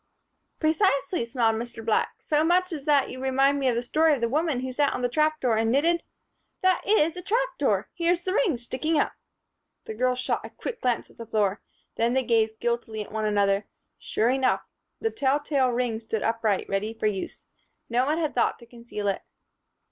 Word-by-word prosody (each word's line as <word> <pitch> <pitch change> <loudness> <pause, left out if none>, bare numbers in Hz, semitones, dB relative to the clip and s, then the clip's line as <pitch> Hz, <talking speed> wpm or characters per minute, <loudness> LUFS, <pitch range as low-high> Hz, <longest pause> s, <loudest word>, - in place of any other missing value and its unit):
"Precisely," 315 - +1
smiled 230 -2 +1
Mr. 235 -1 -6
Black. 225 - +1
"So 300 0 +1
much 360 +2 +3
so 325 -5 -4
that 285 -1 +2
you 255 - -7
remind 270 +2 +2
me 270 - +1
of 240 - +1
the 235 - -1
story 310 +5 +3
of 255 - -7
the 235 - +2
woman 295 0 0
who 260 0 -4
sat 285 +2 +2
on 250 - -3
the - - +3
trap 310 +3 +1
door 235 -4 +1
and 225 0 +1
knitted 335 +6 +3 0.6
By 375 - +6
Jove! - - -2
That - - -15
is 335 -6 +3
a - - -4
trap 485 +7 +1
door! - - +1
Here's 345 0 +1
the 370 - -1
ring 390 - +2
sticking 265 +7 -1
up." - - +1 0.7
The - - -6
girls 250 +3 +1
shot 255 - -1
a - - -7
quick 475 - -6
glance 245 -2 -1
at - - -24
the 230 - -7
floor. 210 -3 0 0.4
Then 230 +1 +2
they 265 0 +2
gazed 225 -2 +1
guiltily 235 -2 -2
at - - -15
one 215 0 -2
another. 200 -1 +1 0.3
Sure 230 +3 +1
enough! 260 0 +2 0.4
The 450 - -1
tell 280 -7 +1
tale 280 -3 +1
ring 240 -2 -1
stood 220 -1 -3
upright, 225 -3 0
ready 210 +3 -2
for 220 - -4
use. 205 -3 -3 0.4
No 245 +3 +1
one 305 +2 +1
had 315 -3 -1
thought - - +1
to 235 - -15
conceal 235 -3 -6
it. 195 - 0
255 Hz, 215 wpm, -26 LUFS, 225-310 Hz, 0.7 s, By